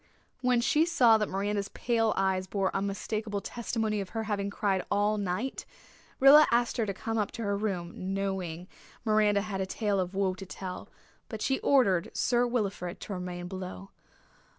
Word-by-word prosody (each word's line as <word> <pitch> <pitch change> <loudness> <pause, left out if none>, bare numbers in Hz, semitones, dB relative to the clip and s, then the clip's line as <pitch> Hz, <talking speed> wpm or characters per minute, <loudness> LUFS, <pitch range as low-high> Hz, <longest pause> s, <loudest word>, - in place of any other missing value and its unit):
When 250 -2 +3
she 305 +6 +3
saw 240 -10 +5
that 210 - -1
Miranda's 200 +1 -1
pale 225 -2 +1
eyes 190 -1 +1
bore 195 -1 -1
unmistakable 205 +2 -2
testimony 220 -1 -2
of 190 - -6
her 225 - 0
having 200 -2 -2
cried 195 -2 0
all 205 +1 +1
night, 205 +7 -2 0.6
Rilla 290 +3 +8
asked 240 0 +1
her 225 -3 0
to 200 - -1
come 225 +3 -2
up 210 - -1
to 230 - -5
her 200 -1 0
room, 190 -2 -3
knowing 185 -3 -3 0.4
Miranda 210 -2 +3
had 195 -2 -3
a 190 - -2
tale 205 0 0
of 185 +1 -2
woe 195 -1 +1
to 195 +1 -9
tell, 185 -1 -7 0.4
but 220 - -5
she 265 - +1
ordered 200 -11 +3
Sir 245 0 +2
Wilfrid 200 -7 -2
to 205 - -5
remain 180 -1 -5
below. 190 +1 -7
200 Hz, 175 wpm, -29 LUFS, 190-225 Hz, 0.6 s, Rilla